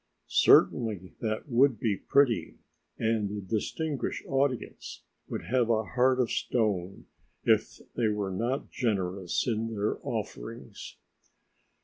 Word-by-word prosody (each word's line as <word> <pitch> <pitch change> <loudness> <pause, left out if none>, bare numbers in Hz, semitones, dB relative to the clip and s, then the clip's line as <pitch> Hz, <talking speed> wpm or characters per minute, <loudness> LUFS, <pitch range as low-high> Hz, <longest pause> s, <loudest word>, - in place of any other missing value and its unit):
Certainly, 105 -6 +4
that 110 +1 -2
would 125 -2 +3
be 110 -4 +1
pretty, 135 +1 +2 0.4
and 110 -2 0
the 105 +1 -4
"distinguished 125 - -3
audience" 135 -2 -2 0.3
would - - -4
have 125 -1 +1
a 110 -1 +2
heart 130 +3 +2
of 125 -3 +1
stone 100 -6 -1 0.4
if - - +2
they 120 -2 +1
were 105 -2 -1
not 120 +9 -2
generous 95 -6 -1
in 115 -1 -1
their 105 +1 -1
offerings. - - -6
110 Hz, 115 wpm, -29 LUFS, 100-125 Hz, 0.4 s, Certainly